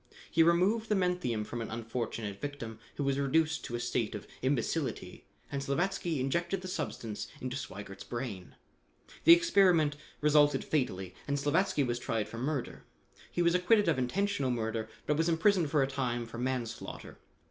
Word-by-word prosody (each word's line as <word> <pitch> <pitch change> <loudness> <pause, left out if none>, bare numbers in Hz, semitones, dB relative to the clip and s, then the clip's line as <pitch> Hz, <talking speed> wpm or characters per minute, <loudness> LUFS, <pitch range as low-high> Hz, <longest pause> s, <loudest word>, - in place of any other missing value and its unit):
He 165 - +4
removed 185 +7 +3
the 210 - +3
menthium 180 - 0
from 120 +2 -5
an 115 - -4
unfortunate 115 -3 -4
victim, 115 -6 -5 0.2
who 145 - -2
was 140 0 +1
reduced 160 +3 +2
to 120 - -4
a - - -2
state 120 -2 -1
of 105 - -7 0.2
imbecility, 135 +3 -2 0.2
and 140 -1 -2
Slavatsky 165 +2 -1
injected 170 +8 0
the 185 - -6
substance 115 - -4
into 130 0 -4
Sweigert's 100 -6 -7
brain. 120 -7 -6 0.7
The 335 - +11
experiment 185 - +4 0.2
resulted 145 -2 +4
fatally 95 - -1
and 140 0 0
Slavatsky 145 +2 +2
was 120 -1 -1
tried 115 -3 -1
for 115 - -7
murder. 135 0 -3 0.5
He 175 - +1
was 170 0 +4
acquitted 180 +3 +4
of 160 -5 +2
intentional 160 +2 0
murder 115 -2 -2 0.2
but 150 - +1
was 165 +1 +2
imprisoned 165 0 +3
for 145 -2 +3
a - - +1
time 125 -3 -2
for 115 +1 -8
manslaughter. 120 -2 -4
140 Hz, 165 wpm, -31 LUFS, 120-170 Hz, 0.7 s, The